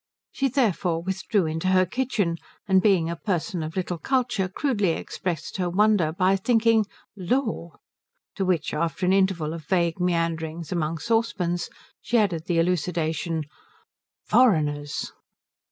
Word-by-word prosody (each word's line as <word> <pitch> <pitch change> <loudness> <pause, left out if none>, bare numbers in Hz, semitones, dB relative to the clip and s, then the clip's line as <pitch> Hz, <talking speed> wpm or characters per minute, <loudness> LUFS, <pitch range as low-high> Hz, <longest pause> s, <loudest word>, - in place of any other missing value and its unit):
She, 275 - 0
therefore, 195 -10 0
withdrew 190 +1 0
into 160 +3 -2
her 185 0 +4
kitchen, 205 -5 -1 0.3
and 190 -1 +4
being 185 -5 +3
a 170 - -2
person 180 0 -2
of 155 +1 -5
little 180 -2 -2
culture 240 - 0
crudely 205 - 0
expressed 170 +1 -4
her 180 -2 0
wonder 200 -3 +3
by 185 +3 +2
thinking 225 0 +3 0.3
"Lor." 200 -3 -2 0.6
To 195 - -2
which, 180 -5 0
after 170 +3 -1
an 185 - +3
interval 190 -5 +1
of 165 -1 -7
vague 170 -1 +1
meanderings 165 -2 -1
among 165 -2 -1
saucepans, 200 -5 -1 0.3
she 240 - +1
added 180 -7 +1
the 175 - +1
elucidation, 165 -1 0 0.8
"Foreigners." 150 - +2
180 Hz, 135 wpm, -25 LUFS, 165-205 Hz, 0.8 s, her